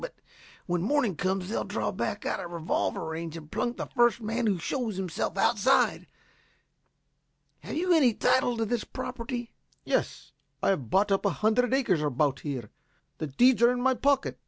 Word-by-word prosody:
But - - -7 0.5
when 175 -1 -1
morning 230 - +1
comes 185 +2 -1
they'll 215 - -2
draw - - -2
back - - -3
out - - -1
of 175 - -6
revolver 170 -1 -2
range 160 0 -5
and 155 -2 -12
plunk 240 +1 -2
the - - -3
first 240 -2 +2
man 225 +1 -1
who 200 -3 +2
shows 220 +3 -3
himself 185 0 -3
outside. 240 +6 +2 1.5
Have - - -7
you 355 +3 +2
any 265 -9 +4
title 245 -2 +2
to 225 - 0
this 235 +1 -1
property?" 245 -1 -6 0.3
"Yes. - - -2 0.3
I - - +3
have 140 - -1
bought 200 +2 +2
up 195 - +2
a - - +3 0.2
hundred 245 +3 +3
acres 235 - +2
about 145 -1 0
here. 130 -8 -5 0.5
The 155 - -2
deeds 240 - +4
are 235 +1 +6
in 250 - -2
my 260 +1 +3
pocket. 280 +2 +1
215 Hz, 180 wpm, -28 LUFS, 170-245 Hz, 1.5 s, are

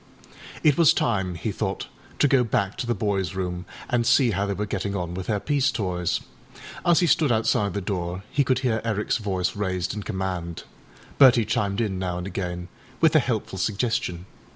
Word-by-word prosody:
It 150 -1 +4
was 165 -1 +7
time, 95 -6 0
he 95 +6 -3
thought, - - -3 0.3
to - - +4
go 135 -2 +4
back 100 -3 0
to 120 - -2
the 120 - +1
boysâ 95 -3 -1
room, 90 -1 -3 0.2
and 120 -1 +1
see 120 +1 +4
how 100 +1 -1
they 100 - -1
were 105 - -2
getting 100 0 -3
on 90 -3 -3
with 90 0 -5
their 105 -2 0
peace 145 +3 +1
toys. 90 -6 -1 0.6
As 175 +1 +4
he - - +4
stood 155 -4 +3
outside 105 -3 +1
the 100 - -1
door 90 -1 -3
he 145 - +2
could 130 -1 +2
hear 110 -3 +1
Ericâs 110 -1 0
voice 95 -4 -1
raised 95 -3 -2
in 105 - -4
command; 95 -4 -4 0.6
Bertie 125 -5 +7
chimed 100 0 0
in 100 -5 -1
now 90 -2 -2
and 90 - -4
again 90 -2 -4 0.3
with 160 -1 +4
a - - +8
helpful 110 -7 -2
suggestion. 100 -4 -1
100 Hz, 195 wpm, -25 LUFS, 90-120 Hz, 0.6 s, a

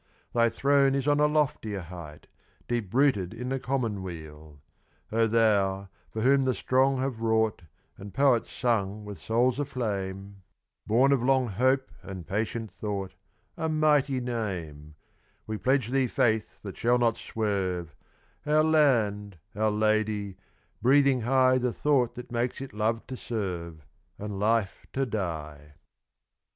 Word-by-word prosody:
Thy 115 -1 +4
throne 140 +2 +3
is 135 0 -1
on 145 0 +3
a 150 - +5
loftier 150 -10 0
height, 85 -3 -10 0.4
Deep 115 -6 -2
rooted 115 -8 +2
in 125 +2 -5
the 135 0 -1
commonweal. 85 - -4 0.5
O 115 +1 +3
thou, 100 -4 +2 0.2
for 110 - -4
whom 135 +1 +4
the 130 - +1
strong 130 +1 +2
have 130 -3 -3
wrought, 110 -2 +1 0.4
And 100 +1 -9
poets 135 -2 +2
sung 105 -4 -1
with 105 -1 -8
souls 120 +3 +1
aflame, 100 -7 -4 0.5
Born 125 +6 +4
of 135 -3 +3
long 130 -1 +2
hope 130 +6 +1
and 95 -4 -8
patient 110 +1 -3
thought, 100 -1 -4 0.4
A 160 - -2
mighty 150 -4 +2
name 90 -12 -5 0.5
We 110 -1 -4
pledge 130 -3 +1
thee 135 0 +2
faith 110 -2 0
that 100 -2 -7
shall 120 +2 +3
not 115 -2 +2
swerve, 95 -7 -2 0.5
Our 155 +1 +3
land, 110 - +2 0.2
our 110 +1 +2
lady, 105 -2 0 0.5
breathing 135 +1 +4
high 130 +2 +3
The 125 -1 0
thought 130 -5 +1
that 125 0 -9
makes 120 +1 -1
it 135 -4 -7
love 110 +2 -1
to 130 - -6
serve, 85 - -5 0.3
And 105 -1 -5
life 110 -1 0
to 135 0 0
die! 75 - -5
115 Hz, 140 wpm, -27 LUFS, 100-130 Hz, 0.5 s, a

